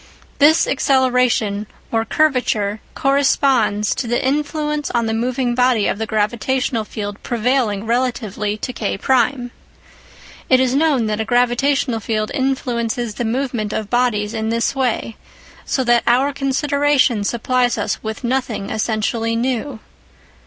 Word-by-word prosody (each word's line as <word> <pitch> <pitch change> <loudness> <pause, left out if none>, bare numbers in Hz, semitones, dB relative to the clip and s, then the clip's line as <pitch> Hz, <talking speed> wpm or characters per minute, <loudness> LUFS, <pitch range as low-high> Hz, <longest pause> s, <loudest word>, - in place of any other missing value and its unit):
This 305 +3 +5
acceleration 250 -6 +1 0.2
or 225 0 0
curvature 225 -8 0
corresponds 270 -6 +2
to 245 - -4
the 240 +2 0
influence 300 +1 -1
on 235 -1 0
the 220 - -1
moving 245 +2 -1
body 250 -4 +2
of 205 - -1
the 225 - -2
gravitational 230 +3 0
field 205 -1 -6
prevailing 235 -3 0
relatively 225 -4 -1
to 250 - -5
K. 210 -4 -2 1.5
It 255 - +5
is 260 -1 +2
known 280 -4 +2
that 215 0 -1
a - - -2
gravitational 245 +1 +1
field 215 0 -2
influences 245 -4 -1
the 240 - -3
movement 235 -3 -2
of 210 -2 -4
bodies 235 -4 +1
in 220 -1 -2
this 230 +1 0
way, 245 -4 -1 0.5
so 260 - 0
that 240 -1 +3
our 265 +4 +3
consideration 280 -4 +1
supplies 245 +3 0
us 215 - -2
with 220 +3 -6
nothing 240 -5 -2
essentially 225 +1 -1
new. 245 +1 -2
240 Hz, 130 wpm, -19 LUFS, 220-265 Hz, 1.5 s, This